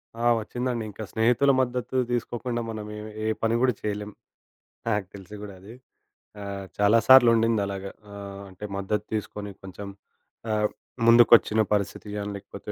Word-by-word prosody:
ఆ! 115 +1 -3 0.2
వచ్చిందండి. 120 +1 -3
ఇంకా 105 +2 -8
స్నేహితుల 120 +5 +3
మద్దతు 125 0 -3 0.2
తీసుకోకుండా 120 0 -2
మనం 110 -1 -5 0.2
ఎం 105 - -8 0.2
ఏ - - 0 0.2
పని 115 +1 +2
కూడా 125 -2 +3
చేయలేం. 105 0 -3 0.8
నాకు 105 -3 0
తెలిసి 100 +1 -10
కూడా 100 -2 -8
అది. 105 +5 -12 0.7
ఆహ్, 100 -1 -5
చాలా 105 +2 +5
సార్లు 130 -2 +9
ఉండిందలాగా. 100 -4 0 0.2
ఆహ్, 100 -1 -8
అంటే, 95 +3 -9
మద్దతు 105 +2 -2
తీసుకొని, 105 -1 -4
కొంచెం 95 +1 -8 0.6
ఆహ్, 105 0 +2 0.4
ముందుకొచ్చిన 115 -2 +6
పరిస్థితి 100 +1 -2
గాని, 105 0 -3
లేకపోతే 100 +1 -9
105 Hz, 140 wpm, -26 LUFS, 100-115 Hz, 0.8 s, సార్లు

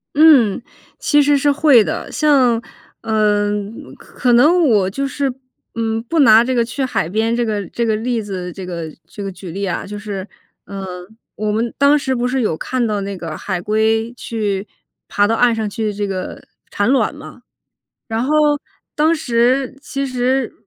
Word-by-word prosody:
嗯， 280 -10 +5 0.4
其 295 -1 +3
实 285 0 +3
是 290 +1 +2
会 280 -5 +5
的。 - - -4
像 260 -6 +3 0.4
呃， 210 -2 +1 0.5
可 - - -18
可 245 -2 +2
能 315 +7 +5
我 200 -5 +3
就 275 +8 -2
是， 275 -1 -2 0.4
嗯， 225 -1 -1
不 320 +7 -1
拿 225 -5 +7
这 255 +1 -1
个 235 -1 +2
去 255 +4 -4
海 255 -10 -1
边 220 +5 0
这 240 - 0
个 210 -3 -2
这 235 - -2
个 220 - +1
例 230 +1 -1
子， 185 -4 -5
这 190 +1 -8
个 170 -2 -5 0.2
这 205 - -8
个 195 - -4
举 185 -1 -9
例 200 +4 -3
啊。 185 - -3
就 205 +1 -7
是， 205 -2 -6 0.4
呃， 185 -2 -7 0.3
我 210 0 -2
们 225 +2 -1
当 280 +2 +5
时 265 -2 -1
不 245 0 0
是 260 +1 0
有 185 -9 0
看 255 +5 -1
到 210 -2 -1
那 200 0 -4
个 165 -3 -6
海 185 -3 -3
龟， 220 +3 +1
去 210 -4 -3 0.4
爬 205 0 +2
到 225 - +1
岸 240 0 +3
上 220 -2 -2
去 215 +1 -3
这 205 0 -3
个 185 -2 -5 0.3
产 205 - 0
卵 260 -2 +2
吗？ 295 -4 -12 0.7
然 225 0 -1
后 275 - -1 0.6
当 310 +2 +3
时 255 -2 +1
其 275 0 -3
实， 255 0 -1
225 Hz, 195 characters per minute, -18 LUFS, 205-260 Hz, 0.7 s, 拿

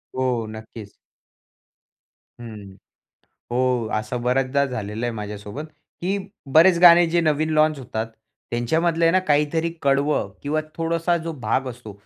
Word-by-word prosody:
हो. 125 -3 0
नक्कीच. 110 -1 -10 1.5
हं. 105 -4 -10 0.8
हो 125 -1 +1
असं 110 +3 -2
बऱ्याचदा 130 +3 +1
झालेलं 110 -3 -4
आहे 120 - -2
माझ्यासोबत, 105 +5 -6 0.4
की 195 +3 -1 0.3
बरेच 170 +2 +6
गाणे 175 -1 +8
जे 170 +1 +1
नवीन 155 -1 +1
लॉन्च 155 -1 +3
होतात. 115 -3 -4 0.4
त्यांच्यामधलं 160 +8 +1
आहे 165 - +4
ना 185 - +4
काहीतरी 150 +3 +2
कडवं 140 -5 +1
किंवा 150 +2 0 0.2
थोडासा 165 +1 0
जो 165 - -2
भाग 135 +2 0
असतो 120 -3 -9
135 Hz, 130 wpm, -22 LUFS, 115-165 Hz, 1.5 s, गाणे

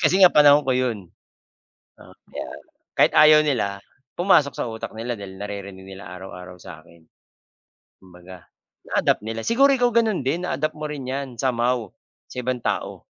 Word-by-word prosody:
Kasi 185 - +3
nga 185 -2 +8
panahon 145 -1 +6
ko 130 - +2
'yon. 125 -3 0 1.0
Oo, - - -16 0.2
yan, - - -7 0.4
kahit - - +5
ayaw 155 0 +7
nila, 100 -8 -1 0.4
pumasok 160 -6 +3
sa - - -3
utak 110 0 -6
nila 120 +2 -3
dahil 100 -3 -10
naririnig 100 -2 -7
nila 95 0 -10
araw-araw 90 -1 -10
sa'kin. 85 -1 -14 1.0
Kumbaga, 90 -1 -15 0.4
na-adapt - - +1
nila 115 0 -4
siguro, 270 +4 +4
ikaw 245 -2 +2
gano'n 220 - +1
din, 165 +7 -1
na-adapt 155 +2 -2
mo 155 - -6
rin 145 -3 -6
'yan 135 +2 -3
somehow, 120 -2 -1 0.4
sa 125 - -6
ibang 125 0 -2
tao. - - -3
125 Hz, 155 wpm, -22 LUFS, 100-150 Hz, 1.0 s, nga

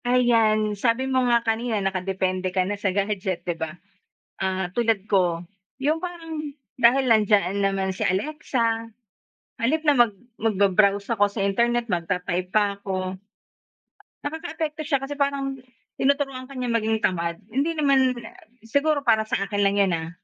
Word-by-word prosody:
Ayan, 225 -4 +3
sabi 230 +5 +1
mo 260 -1 +1
nga 235 -1 +3
kanina 225 0 0
nakadepende 190 -1 -1
ka 185 0 0
na 205 - -2
sa 205 -1 -1
gadget, 190 -2 -2
'di 175 - 0
ba? 160 -1 -4 0.7
Ah, 190 -1 -1
tulad 225 -4 +1
ko, 175 -4 +1 0.3
yung 305 +5 0
parang 325 -4 -5 0.2
dahil 255 +2 +4
nandiyan 205 -3 +3
naman 195 -1 0
si - - -3
Alexa, 230 0 -1 0.5
sa - - -19
halip 310 +7 +1
na 295 - +6
mag 240 -5 +4 0.3
magba-browse 200 0 +2
ako 205 -2 +3
sa 200 -1 -2
internet, 235 +4 +1
magta-type 180 +1 -2
pa 205 0 +2
ako 185 -1 -4 1.0
Nakakaapekto 315 0 -4
siya 280 -3 +1
kasi 280 +1 -5
parang, 280 -1 -1 0.4
tinuturuan 275 -2 0
ka 275 - -12
niya 250 -1 -2
maging 220 -1 +1
tamad, 170 -2 0
hindi 280 +7 0
naman 270 -3 +3 0.5
siguro 285 +5 +1
para 225 -3 +4
sa - - 0
akin 205 0 -2
lang 200 0 +3
yun, 195 -3 +3
ah, 160 0 -6
220 Hz, 150 wpm, -24 LUFS, 195-265 Hz, 1.0 s, na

